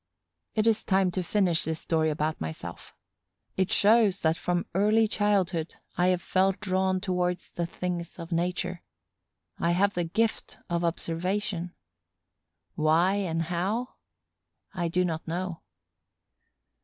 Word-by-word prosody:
It 215 -1 +2
is 225 -1 +3
time 190 -2 +2
to 185 - -1
finish 180 -2 +2
this 160 0 -3
story 160 -1 +1
about 155 +1 -1
myself. 80 0 -7 0.6
It 190 +2 0
shows 210 -3 +4
that 160 0 +3
from 175 +1 -1
early 215 +4 +4
childhood 190 -6 0 0.2
I 180 - +2
have 180 -1 +1
felt 190 +1 +2
drawn 190 -2 +1
towards 180 -2 -1
the 170 -1 -2
things 175 -1 -4
of 170 0 -8
nature. 180 +1 -1 0.8
I 170 +1 +2
have 200 +3 +2
the 175 - 0
gift 220 +7 -1
of 170 0 0
observation. 175 +2 -2 1.0
Why 160 +5 +3
and 165 -4 -1
how? 190 +9 -1 0.8
I 175 -2 -1
do 180 +2 +1
not 165 -2 -3
know. 175 0 -3
180 Hz, 130 wpm, -28 LUFS, 170-195 Hz, 1.0 s, shows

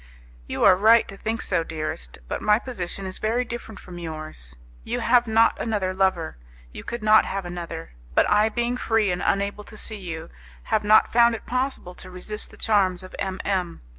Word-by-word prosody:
"You - - -2
are 190 - +8
right 220 +4 +5
to 195 - -8
think 220 +3 -3
so, 165 - 0
dearest, 155 - -5
but - - -3
my 210 0 +4
position 195 -6 -5
is 190 0 -5
very 235 +3 0
different 230 -2 -7
from 175 -1 -10
yours. 155 - -8 0.3
You - - -2
have 240 0 +3
not 225 +1 +3
another 205 -5 -1
lover; 185 - 0 0.3
you - - -9
could 235 -2 -5
not 215 0 +6
have 195 -1 -3
another; 170 -2 -6 0.2
but - - +4
I 210 +1 +4
being 240 +2 -1
free 225 -5 +1
and 180 - -2
unable 200 +1 0
to 215 - -12
see 215 0 -6
you, 165 -3 -7 0.3
have 220 -1 0
not 215 +1 +5
found 235 0 +5
it - - -9
possible 255 -7 -2
to 185 - -11
resist 195 +4 -6
the - - -15
charms 190 -4 +2
of 185 - -11
M 190 -1 -3
M 185 -4 -1
200 Hz, 195 wpm, -24 LUFS, 180-225 Hz, 0.3 s, are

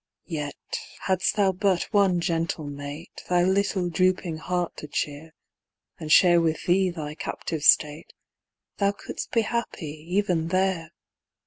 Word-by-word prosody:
Yet, 150 -2 -3 0.5
hadst 190 +1 +1
thou 200 -3 +3
but 190 -1 +1
one 195 -4 +3
gentle 165 -2 -1
mate 145 +3 -8
Thy 175 -1 +3
little 190 -1 +1
drooping 180 -1 +1
heart 175 +1 -2
to 150 - -7
cheer, 150 +2 -4 0.6
And 155 -1 -5
share 175 0 +7
with 160 -1 -1
thee 185 +1 +3
thy 155 -4 -5
captive 160 0 -4
state, 150 +1 +3 0.7
Thou 200 0 +2
couldst - - -7
be 230 - +3
happy 165 -10 -4
even 180 -4 +1
there. 185 -2 0
175 Hz, 135 wpm, -25 LUFS, 155-190 Hz, 0.7 s, share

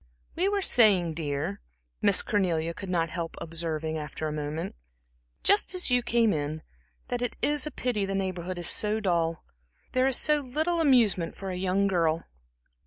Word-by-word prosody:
"We 370 +3 +1
were 405 -1 0
saying, 195 - +4
dear," 145 - -3 0.4
Miss - - +5
Cornelia 170 -5 0
could 190 +2 -8
not 165 -3 0
help 170 -2 -5
observing 160 -1 -3
after 155 +1 -5
a - - -3
moment 150 +2 -4 0.7
"just 405 -2 +3
as 360 -7 +2
you 245 0 +4
came 235 -2 +2
in, 155 +1 -3 0.5
that 245 -1 -2
it 245 - -2
is 295 0 +2
a - - -5
pity 240 -5 -1
the 195 - -3
Neighborhood 185 -2 -3
is 175 - -3
so 215 +1 +1
dull. 170 -5 -1 0.5
There 255 +1 +2
is 265 - +4
so 300 -1 +3
little 310 +6 -1
amusement 230 - +3
for 195 -1 -5
a - - -4
young 190 +2 0
girl." 165 -4 +1
185 Hz, 175 wpm, -27 LUFS, 165-245 Hz, 0.7 s, Miss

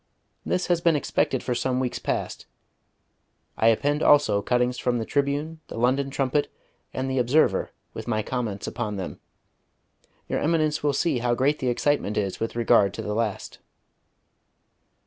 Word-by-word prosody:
This 180 - -1
has 175 -1 +1
been 170 -2 +3
expected 135 -2 0
for 125 - -1
some 125 +1 0
weeks 125 -2 -2
past. - - -3 1.1
I 110 - +2
append 145 +6 +2
also 105 -8 +4
cuttings 125 +2 0
from 125 -1 0
the 115 - -2
Tribune, 145 +4 -1
the - - -8
London 130 +4 +1
Trumpet, 135 +1 0 0.4
and 130 0 -3
the 130 0 0
Observer, 125 +6 +2 0.2
with - - -7
my 110 -2 0
comments 110 -5 -3
upon 110 -4 -3
them. 95 -2 -6 1.1
Your - - -1
Eminence 155 -1 +1
will 145 -1 +1
see 140 -3 +1
how 120 0 +1
great 140 +4 +1
the 130 - -2
excitement 120 -3 0
is 100 -3 -1
with 115 +1 -3
regard 105 -4 +3
to - - -5
the 105 - -3
last. 110 -2 -3
125 Hz, 160 wpm, -25 LUFS, 115-145 Hz, 1.1 s, also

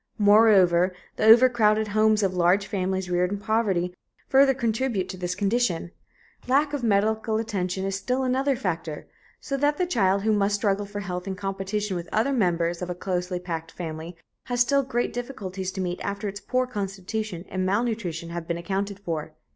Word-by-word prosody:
Moreover, 195 -4 +5 0.2
the - - 0
overcrowded 220 -2 +5
homes 215 0 +3
of 190 -1 +1
large 180 +3 +3
families 190 -1 -2
reared 180 +1 +1
in 205 - -1
poverty 200 -5 0 0.3
further 270 0 +5
contribute 230 -5 -1
to 185 - -5
this 180 0 -3
condition. 200 -4 0 0.6
Lack 285 +3 +2
of 290 - -2
medical 220 +1 +1
attention 190 -4 -2
is 195 0 -1
still 250 +6 -1
another 265 +2 +1
factor, 165 - -4 0.3
so 275 - -3
that 290 +1 +1
the 365 - +1
child 200 - +1
who 220 0 +2
must 205 0 +2
struggle 205 -1 0
for 205 0 -5
health 180 -1 -5
in 190 - -3
competition 195 +1 -3
with 175 -1 -5
other 230 +6 +1
members 175 -6 0
of 180 - -4
a 180 - -3
closely 180 0 -2
packed 165 -2 -5
family 165 0 -6 0.3
has 245 -1 -2
still 275 +3 +4
great 255 -2 -2
difficulties 195 -7 -5
to 190 - -3
meet 180 -1 -3
after 200 +1 -3
its 200 +1 -6
poor 255 0 0
constitution 200 -3 -4
and 185 0 -2
malnutrition 190 -5 -1
have 170 -1 -5
been 170 - -1
accounted 195 +3 -3
for. 160 -5 -5
200 Hz, 180 wpm, -25 LUFS, 180-225 Hz, 0.6 s, Moreover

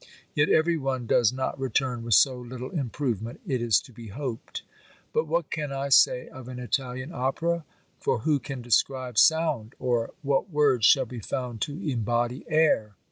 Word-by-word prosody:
Yet 145 0 +2
every 165 +1 +3
one 135 -4 -2
does 115 -1 +3
not 130 +1 -3
return 130 -2 -1
with 115 -3 +3
so 130 -3 +4
little 125 +1 -7
improvement, 120 - -3
it 130 -3 -1
is 115 -4 +4
to 125 - -16
be 115 0 -10
hoped. 120 +2 -6 0.5
But 465 +1 +1
what - - -1
can 150 -3 -3
I 135 +1 -3
say 125 -1 +5
of 130 -2 -11
an 125 -1 -7
Italian 130 +2 -3
opera? 165 +6 -1 0.3
For - - 0
who 150 +3 +2
can 135 -2 -7
describe 125 +1 +1
sound! 155 -8 +3
Or 120 -2 0
what 140 +7 0
words 140 -7 +3
shall 135 -2 +5
be 120 0 -8
found 120 +1 -4
to 145 - -3
embody 120 -1 -1
air? 155 -10 +2
130 Hz, 175 wpm, -26 LUFS, 120-145 Hz, 0.5 s, say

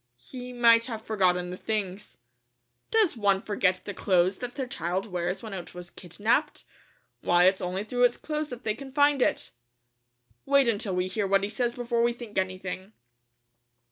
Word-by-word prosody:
"He 250 - -9
might 235 -1 +5
have 225 -3 -5
forgotten 180 -5 +1
the 180 - -6
things." 205 -1 -4 0.7
"Does 440 -9 +3
one 200 -3 +2
forget 190 -2 0
the 205 - -5
clothes 185 0 +2
that 245 -1 -6
their 270 - -2
child 185 -5 -2
wears 180 -1 -3
when 220 -3 -7
it 180 -2 -7
was 175 -1 -8
kidnaped? 215 - -1 0.6
Why, 175 0 +4
it's 190 +1 +4
only 185 +2 -2
through 245 +3 +2
its 245 - +1
clothes 305 -1 -3
that 245 -1 -8
they 215 - 0
can 270 +4 -10
find 285 0 +3
it." - - 0 0.9
"Wait 280 -2 +4
until 205 -4 0
we 180 0 +1
hear 195 +2 -2
what 195 0 +3
he 200 - -1
says 240 +2 -1
before 240 -1 -1
we 235 0 +2
think 235 -3 -10
anything." 185 +1 -4
210 Hz, 175 wpm, -27 LUFS, 185-245 Hz, 0.9 s, might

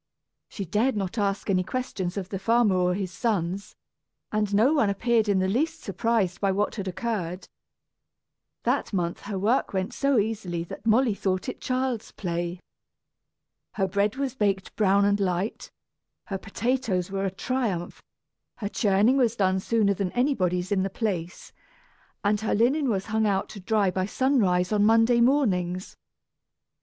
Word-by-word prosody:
She 200 - -5
dared 215 +7 +1
not 195 +3 -3
ask 200 -1 -1
any 185 -3 +2
questions 195 -5 -3
of 190 -2 -4
the 195 - -4
farmer 225 -1 +3
or 180 0 +2
his 190 -2 -3
sons, 195 -2 -2 0.6
and 210 -1 0
no 220 +9 +4
one 255 -10 +3
appeared 220 +2 +1
in 200 - +3
the 190 0 +1
least 310 +10 0
surprised 195 -2 0
by 195 -1 +2
what 205 +2 0
had 200 -4 -5
occurred. 185 -2 -3 1.2
That - - 0
month 175 -3 -1
her 200 - -2
work 215 +6 +1
went 190 0 -2
so 275 -2 +1
easily 200 -6 -1
that 175 - -9
Molly 230 +1 +4
thought 190 0 -2
it 255 - -5
child's 255 -3 -2
play. 175 -1 -3 1.1
Her 195 -2 0
bread 200 +3 0
was 270 -2 -2
baked 200 -6 -1
brown 200 -1 +3
and 205 0 +2
light, 190 +2 -2 0.6
her 195 -1 -4
potatoes 205 -3 -1
were 195 0 -1
a - - +1
triumph, 195 -3 -3 0.5
her 205 -3 -4
churning 210 +5 +3
was 240 -4 +2
done 190 -3 +2
sooner 210 0 +2
than 195 -2 -2
anybody's 185 -9 0
in 195 -2 +2
the 195 - -1
place, 185 -4 -4 0.7
and 205 +1 +1
her 220 - 0
linen 260 +6 +2
was 195 -4 -1
hung 220 0 +1
out 195 -1 0
to 205 - -9
dry 200 0 +1
by 185 +1 -1
sunrise 205 -8 +2
on 210 -1 +3
Monday 225 +2 +4
mornings. 190 -9 +1
200 Hz, 160 wpm, -26 LUFS, 185-230 Hz, 1.2 s, no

